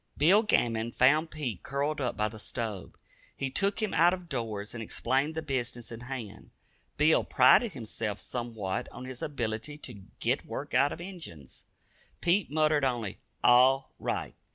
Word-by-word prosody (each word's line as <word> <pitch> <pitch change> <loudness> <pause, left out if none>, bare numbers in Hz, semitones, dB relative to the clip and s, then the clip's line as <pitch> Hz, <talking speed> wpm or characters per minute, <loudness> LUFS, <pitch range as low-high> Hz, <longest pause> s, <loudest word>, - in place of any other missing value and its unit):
Bill 180 +9 +6
Gammon 115 - +1
found 150 +6 +4
Pete 130 - -4
curled 145 +2 -2
up 125 - -1
by 105 - +2
the 110 0 -8
stove. 110 -3 -5 0.4
He 135 -1 -2
took 200 +7 +1
him 215 - -1
out 170 +3 +5
of 180 -2 -13
doors 110 -6 -4
and 115 - -6
explained 135 +7 0
the 160 - -3
business 125 -5 -3
in 115 - -7
hand. 120 -4 -7 0.5
Bill 150 +2 +4
prided 235 -5 +5
himself 110 -3 -4
somewhat 115 -6 -4
on 130 - -8
his 130 -1 -7
ability 125 0 -3
to 120 -8 -8 0.2
"git - - 0
work - - -6
out 140 +1 +4
of - - -6
Injuns." 165 - -10 0.5
Pete 175 +2 +2
muttered 155 -1 +2
only 120 -7 -1 0.2
"all 130 +2 +5
right." - - -3
130 Hz, 160 wpm, -29 LUFS, 115-155 Hz, 0.5 s, Bill